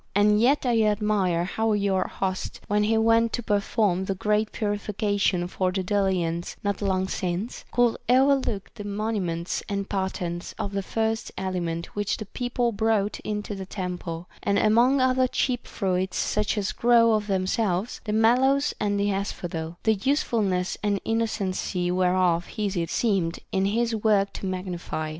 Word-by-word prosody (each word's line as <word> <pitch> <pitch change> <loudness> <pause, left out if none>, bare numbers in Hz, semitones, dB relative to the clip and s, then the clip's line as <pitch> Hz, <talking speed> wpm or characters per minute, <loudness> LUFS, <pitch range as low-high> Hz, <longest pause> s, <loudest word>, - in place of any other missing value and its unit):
And 210 +1 +4
yet 275 +4 +3
I 235 -2 +3
admire 210 -5 +1
how 220 +4 0
your 200 -2 +1
host, 185 -1 -3
when 210 0 +2
he 225 +1 +2
went 230 +1 +3
to 240 - -2
perform 205 -3 +1
the 195 - -2
great 210 +2 0
purification 205 -3 0
for 185 0 -1
the 190 0 -2
Delians 180 -4 0
not 205 0 -1
long 190 -1 +1
since, 185 +5 -3
could 245 -2 +3
overlook 260 -5 +2
the 205 - -8
monuments 200 -5 -2
and 200 -1 -2
patterns 185 -3 -3
of 200 - -3
the 200 0 -1
first 220 +3 -2
aliment 175 -3 -3
which 205 -1 -1
the 215 - -6
people 245 +2 -1
brought 215 -1 0
into 210 0 -4
the 190 -2 -6
tem 180 -3 -4
ple, 165 0 -6
— - - -24
and, 200 0 +1
among 235 +6 +4
other 255 0 +3
cheap 250 -1 -1
fruits 185 -2 -1
such 210 +1 0
as 200 -2 0
grow 235 -1 +4
of 210 -1 0
them 190 -2 0
selves, 195 0 -1
the 210 - -2
mallows 255 +6 +3
and 205 -2 0
the 200 0 +1
asphodel; 175 -4 -4
the 220 - +4
usefulness 205 -6 0
and 205 -1 0
innocency 195 -5 -1
whereof 180 -1 +2
Hesiod 190 -6 -1
seemed 190 -8 0
in 190 0 +1
his 230 +3 +1
work 205 -2 +2
to 195 - -5
magnify. 180 -4 -4
205 Hz, 160 wpm, -25 LUFS, 185-220 Hz, -, And